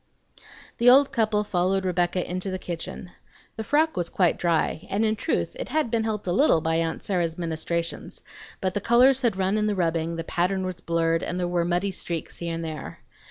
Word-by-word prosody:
The 240 +1 +6
old 275 +2 +6
couple 215 -2 +1
followed 190 -1 0
Rebecca 180 0 0
into 185 +2 -3
the 185 - -3
kitchen. 175 0 -7 0.4
The 220 - -4
frock 310 +6 +2
was 175 -1 -2
quite 180 -3 +1
dry, 165 -2 0
and 210 +3 +1
in 215 0 +1
truth 320 - -2
it - - -5
had 305 -7 0
been 225 -2 +1
helped 215 -2 -3
a 180 - -1
little 195 - +4
by 160 +1 0
aunt 165 -1 -2
Sarah's 170 -4 -1
ministrations; 170 0 -3 0.4
but 185 -2 -1
the 205 - -2
colors 250 +3 +5
had 230 -6 +1
run 195 +2 +1
in 210 - +1
the 210 - 0
rubbing, 165 -2 0
the 165 - -4
pattern 185 +3 -1
was 180 -1 -5
blurred, 165 0 +1
and 180 - -3
there 180 - 0
were 175 -1 0
muddy 175 +3 0
streaks 170 -3 -4
here 170 -1 -3
and 165 - -4
there. 155 -3 -7
180 Hz, 210 wpm, -25 LUFS, 170-215 Hz, 0.4 s, The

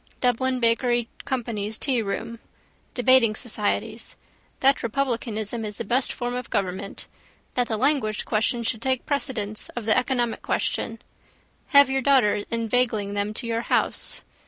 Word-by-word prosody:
Dublin 255 +1 +1
Bakery 240 0 +2 0.2
Company's 220 -5 -2
tearoom. 230 -2 -1 0.6
Debating 245 -3 +5
societies. 220 0 -2 0.5
That 275 +1 +4
republicanism 230 -3 -2
is 210 -1 -5
the - - -3
best 250 +5 +1
form 245 0 -3
of 250 0 -5
government. 195 -2 -3 0.5
That 245 -1 +1
the 220 - -1
language 255 -4 +1
question 230 +2 +1
should 225 -1 -1
take 260 0 0
precedence 235 -8 -2
of 240 -3 -4
the 215 - +4
economic 245 -2 0
question. 230 - -1 0.7
Have 280 -2 +6
your 270 0 +1
daughters 245 -7 +3
inveigling 230 -3 0
them 205 +1 -1
to 240 - -3
your 230 0 -1
house. - - -1
235 Hz, 135 wpm, -25 LUFS, 215-255 Hz, 0.7 s, Have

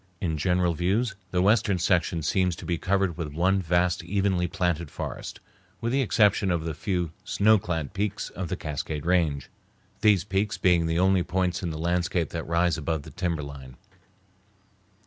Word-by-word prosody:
In 85 -4 -1
general 90 +2 +1
views 100 +7 0 0.2
the 90 0 +1
western 105 -1 +3
section 85 -1 +1
seems 90 +3 +1
to - - -10
be 85 -2 -1
covered 95 -3 0
with 80 - -3
one 95 +5 +2
vast, 90 +1 +1
evenly 95 -2 0
planted 85 -3 -1
forest, - - -6 0.4
with 115 - -2
the 135 +2 +2
exception 105 -4 +3
of 85 -3 0
the 80 - -2
few 90 0 -2
snow 110 +1 +4
clad 80 -5 -3
peaks 105 +1 -2
of 95 -1 -5
the - - -3
Cascade 75 0 -4
Range, 80 -6 +1 0.5
these 100 -4 +4
peaks 100 +1 -1
being 85 -3 +3
the 80 0 0
only 95 +1 +3
points 90 0 -1
in 90 - -2
the 80 - -4
landscape 85 +1 0
that 85 -1 -5
rise 85 +1 +1
above 80 -1 -2
the - - -11
timberline. 70 -7 -4
90 Hz, 170 wpm, -26 LUFS, 80-95 Hz, 0.5 s, snow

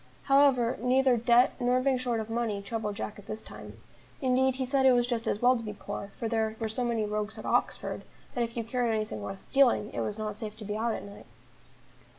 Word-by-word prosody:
However, 275 -4 +4
neither 255 +1 +4
debt 240 +2 +4
nor 250 0 +2
being 260 0 +1
short 245 -2 -1
of 220 - -4
money 225 -3 -1
troubled 210 0 -4
Jack 210 - -5
at 200 - -15
this 215 - -5
time; - - -11 0.4
indeed 260 -1 +2
he 260 0 -2
said 265 +1 +2
it 260 -1 +7
was 245 -1 +3
just 240 -2 -2
as 210 - -1
well 250 +1 +6
to 235 - -3
be 210 -1 -5
poor, 200 0 -7
for 230 - -2
there 220 -1 0
were 225 -1 -2
so 235 +3 -1
many 230 -3 0
rogues 210 0 -3
at - - -8
Oxford, - - 0 0.3
that 240 - 0
if 230 0 -5
you 230 - -1
carried 235 0 0
anything 215 0 -3
worth 195 0 -6
stealing, 255 -6 +3
it - - -3
was 210 - -2
not 215 -1 -3
safe 215 0 -7
to 215 - -7
be 210 +1 -3
out 225 +1 0
at - - -6
night. 200 0 -12
230 Hz, 235 wpm, -29 LUFS, 215-250 Hz, 0.4 s, it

